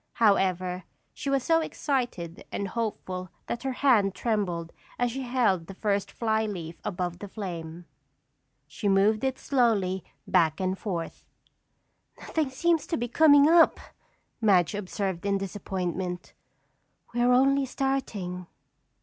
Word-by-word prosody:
However, 185 -4 +2 0.3
she 280 - -4
was 275 -2 +1
so 325 +2 +3
excited 245 - -3
and 200 -1 -3
hopeful 185 -5 -4 0.2
that 235 - -4
her 265 - -2
hand 205 -8 +4
trembled 180 -8 -1 0.2
as 245 -1 +1
she 270 +3 -4
held 240 -9 +1
the 195 - -9
first 200 -1 -1
fly 220 -1 0
leaf 170 -5 -6
above 175 -2 -3
the 205 - -7
flame. 175 -4 -6 0.8
She 205 - -3
moved 205 +3 +3
it 265 -1 0
slowly 210 -8 +1 0.2
back 160 -2 +2
and 185 0 0
forth. 180 -5 -5 1.0
"Nothing 310 -4 -1
seems 330 +4 +1
to 330 - -1
be 240 - -2
coming 290 +2 +6
up," 330 0 +6 0.6
Madge 190 -5 +4
observed 195 -2 -3
in 200 0 +1
disappointment. 185 -2 -4 0.8
"We're 240 +1 +3
only 270 +2 +4
starting." 210 -11 -2
205 Hz, 130 wpm, -27 LUFS, 180-250 Hz, 1.0 s, coming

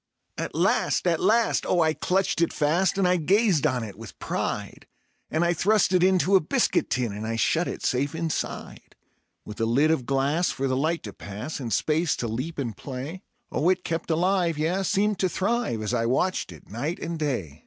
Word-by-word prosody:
At - - -5
last, - - +1
at - - +2
last! 235 -12 +2
Oh, 175 - +2
I 160 0 +2
clutched 185 0 0
it 170 - +2
fast, 170 +7 +1
and 195 -2 +3
I 180 0 +3
gazed 180 -2 +3
on 130 -4 -1
it 105 -3 -7
with 115 -2 -10
pride; - - -4 0.4
And 160 +2 +1
I 170 - +2
thrust 200 +3 +2
it 180 - +4
into 185 +1 +4
a - - +8
biscuit - - +1
tin, 120 -4 -1
and 105 +2 -5
I 115 - -2
shut 165 +9 +1
it - - -5
safe 140 +3 0
inside; 165 -2 -4 0.5
With 105 +1 -7
a - - +3
lid 140 +7 +3
of 135 -7 -1
glass 140 +6 +1
for 135 +1 -2
the 130 - 0
light 160 +5 0
to 105 - -7
pass, 105 +11 -6
and 120 -4 -5
space 155 - +1
to 120 - -3
leap 130 +9 -4
and 120 -7 -3
play; 140 - -7 0.3
Oh, 165 - +1
it 185 -1 +1
kept 165 +1 -3
alive; 175 0 +1
yea, 165 +5 0
seemed 200 +2 +1
to 185 - +2
thrive, 200 - -1
as 105 - -2
I 115 -1 +1
watched 160 - 0
it 80 -4 -14
night 135 - -3
and 170 -1 -5
day. 100 - -3
155 Hz, 205 wpm, -25 LUFS, 125-180 Hz, 0.5 s, a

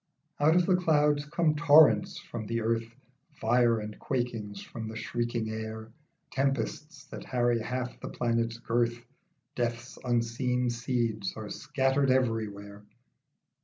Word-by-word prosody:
OUT 155 +3 +4
of 180 -1 +4
the 185 - +4
clouds 150 -4 +2
come 155 +1 +1
torrents, 150 -8 +5
from 110 -3 -7
the 115 +1 -1
earth 115 0 0 0.5
Fire 115 0 +3
and 105 0 -7
quakings, 115 -6 -3
from 110 +1 -7
the 110 - -7
shrieking 120 +1 -2
air 110 0 -6 0.4
Tempests 135 +3 -2
that - - -7
harry 120 -2 +1
half 125 +2 -4
the - - -6
planet's 115 -1 -1
girth. 120 0 0 0.6
Death's 120 0 -3
unseen 125 +1 0
seeds 115 -4 -2
are 110 -1 -6
scattered 135 0 +1
every 115 -4 +2
where. 100 0 -11
120 Hz, 130 wpm, -29 LUFS, 110-130 Hz, 0.6 s, torrents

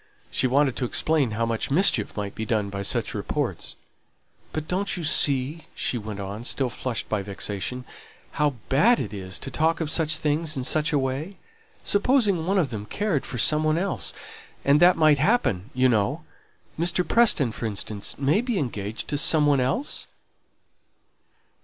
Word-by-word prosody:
She - - +2
wanted 135 0 +2
to 130 - -1
explain 150 +1 +1
how 115 - +1
much 115 -1 -2
mischief 140 - +3
might 100 -1 -3
be 110 - -5
done 105 -2 -1
by 100 0 -4
such 100 - -1
reports. - - -3 0.8
"But 155 0 -4
don't 195 +2 -1
you 175 - -5
see," 150 +1 +1
she 120 - -1
went 105 -1 -7
on, 100 +3 -6
still 130 0 -1
flushed 125 -1 -3
by 105 -2 -1
vexation, 100 +5 -4 0.5
"how 150 -2 0
bad 220 - +4
it - - -4
is 95 -2 -5
to - - -7
talk 160 +1 +1
of 160 -2 -2
such 160 -2 +2
things 155 0 0
in 130 - -2
such 155 +4 +1
a 150 - +2
way? 140 +8 -3 0.5
Supposing 205 -6 +2
one 195 +1 +2
of 155 -9 +1
them 105 -2 -6
cared 205 -9 -1
for 125 - -4
some 150 +7 +4
one 155 +1 +2
else, 190 +2 -1 0.5
and 140 +2 +5
that 175 +2 +6
might 155 -3 +4
happen, 140 - +1
you 130 0 +4
know; 105 -5 0 0.6
Mr. 175 +1 +2
Preston, 195 - +3
for 115 - -4
instance, 105 0 -4
may 145 +9 +2
be 240 -3 -2
engaged 110 - -4
to 145 - 0
some 155 -1 +4
one 145 -2 +3
else?" 135 - -1
140 Hz, 175 wpm, -25 LUFS, 115-165 Hz, 0.8 s, that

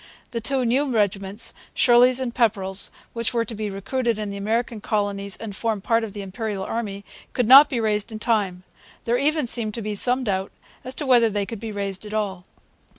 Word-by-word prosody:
The 230 - -3
two 260 +2 0
new 265 +5 +1
regiments, 200 -1 0 0.2
Shirley's 250 0 +5
and 250 -2 -3
Pepperrell's, 200 -5 0 0.2
which 230 +1 -2
were 230 -1 +1
to 235 - -7
be 215 -1 -3
recruited 230 +4 -1
in 210 -1 -4
the - - -6
American 225 +2 -1
colonies 200 -2 -1
and 215 -3 -7
form 220 0 -1
part 230 +3 +1
of 215 -3 -5
the 205 -1 -6
Imperial 195 +1 -4
Army, 200 -2 -4 0.3
could 250 - +1
not 275 +4 +9
be 245 - -1
raised 215 0 0
in 220 - -5
time. 205 -5 0 0.4
There 240 +1 +1
even 300 +1 +1
seemed 225 -3 0
to 230 - -4
be 210 0 -3
some 250 +5 +3
doubt 190 -3 -2 0.3
as 255 +1 -5
to 295 - -3
whether 240 -3 +5
they 205 -1 -1
could 225 +1 -7
be 225 0 -5
raised 200 -1 -3
at 210 - -6
all. 190 -4 -2
220 Hz, 210 wpm, -23 LUFS, 200-240 Hz, 0.4 s, not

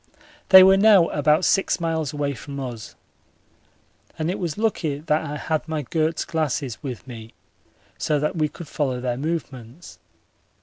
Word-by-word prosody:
They 190 -1 +10
were 190 +1 +6
now 200 -4 +5
about 150 +3 +2
six 195 - +1
miles 160 -3 -2
away 145 -1 -2
from 140 +1 -8
us, 120 -5 -7 1.2
and 160 +2 -1
it - - -5
was 170 -2 -3
lucky 185 -10 -1
that 150 +1 -1
I 150 +1 -5
had 155 +1 -3
my 155 -2 -3
Goerz 160 +3 -1
glasses 145 -7 -3
with 125 -8 -7
me 115 -3 -11 0.6
so 150 - 0
that 150 +5 -1
we 155 -2 0
could 170 - -11
follow 135 -4 -2
their 125 -1 -2
movements. 140 -2 -6
150 Hz, 160 wpm, -23 LUFS, 135-165 Hz, 1.2 s, They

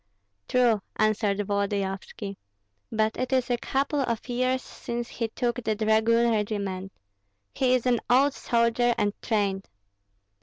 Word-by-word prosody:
"True," 240 -4 +3
answered 215 -2 +1
Volodyovski; 200 0 -2 0.6
"but 220 0 +1
it 255 +1 -2
is 255 -1 +1
a 240 - +2
couple 280 +4 -1
of 235 -4 -2
years 255 +1 0
since 235 0 -5
he 230 - -2
took 240 +2 -2
the 220 -1 0
dragoon 225 +2 +3
regiment. 200 -3 -2 0.6
He 255 -1 +3
is 250 - -1
an 245 -2 +3
old 270 +3 +5
soldier, 235 0 +2
and 205 0 +1
trained." 200 -4 -1
230 Hz, 130 wpm, -26 LUFS, 205-245 Hz, 0.6 s, old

